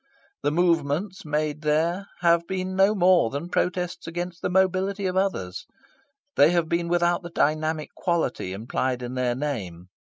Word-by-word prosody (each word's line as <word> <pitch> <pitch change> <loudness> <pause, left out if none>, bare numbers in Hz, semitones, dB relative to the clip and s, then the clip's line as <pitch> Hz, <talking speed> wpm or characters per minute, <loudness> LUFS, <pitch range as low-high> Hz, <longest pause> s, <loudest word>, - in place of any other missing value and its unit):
The - - +1
"movements" 170 +3 0
made 150 0 -1
there 165 +6 0
have 170 -1 +3
been 185 0 -3
no 195 +3 +4
more 180 - +4
than 145 +7 -5
protests 180 -1 -1
against 175 +1 -5
the - - -1
mobility 190 +2 +1
of 185 0 -1
others. 185 - -2 0.7
They 145 - +6
have 170 -2 +1
been 170 +1 0
without 175 0 +2
the 175 - -8
dynamic 155 -1 0
quality 165 - -1
implied 125 +5 -2
in 120 +1 -5
their 125 -1 0
name. 100 - -4
170 Hz, 155 wpm, -25 LUFS, 145-180 Hz, 0.7 s, They